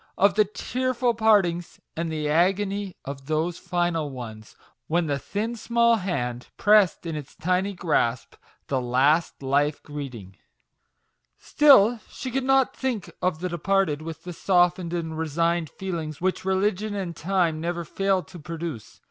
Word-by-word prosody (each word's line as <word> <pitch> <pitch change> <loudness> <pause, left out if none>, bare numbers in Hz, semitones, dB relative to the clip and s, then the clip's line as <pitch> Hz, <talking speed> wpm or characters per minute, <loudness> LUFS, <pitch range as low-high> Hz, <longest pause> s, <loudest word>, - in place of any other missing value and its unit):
of 200 +1 +4
the 215 +1 +4
tearful 250 +3 -1
partings, 200 -6 +2 0.2
and 165 0 -2
the 155 -1 -2
agony 195 +4 +1
of 135 -1 -7
those 160 +3 -1
final 175 -4 -1
ones, 110 -5 -9 0.3
when 170 +2 +1
the 140 -2 -1
thin, 215 - -3
small 235 0 +3
hand, 125 - -3
pressed 205 -4 +4
in 165 -2 -3
its 145 -2 -8
tiny 185 +3 0
grasp 130 -9 0 0.3
the 135 -2 -1
last 135 +6 +2
life 145 +2 +1
greeting! 125 -10 -8 1.0
Still 245 -6 +5
she 260 - -6
could 265 +1 -1 0.3
think 250 -7 -3
of 180 -3 0
the 180 - -2
departed 170 -2 0
with 160 0 -7
the 180 - -6
softened 175 -1 +2
and 160 -2 -3
resigned 165 +1 0
feelings 165 -6 -5
which 185 +1 -1
religion 205 +2 0
and 185 -4 -4
time 170 -2 0
never 170 0 -3
fail 195 +1 0
to 185 -2 -12
produce. 160 -6 -7
175 Hz, 145 wpm, -25 LUFS, 155-195 Hz, 1.0 s, Still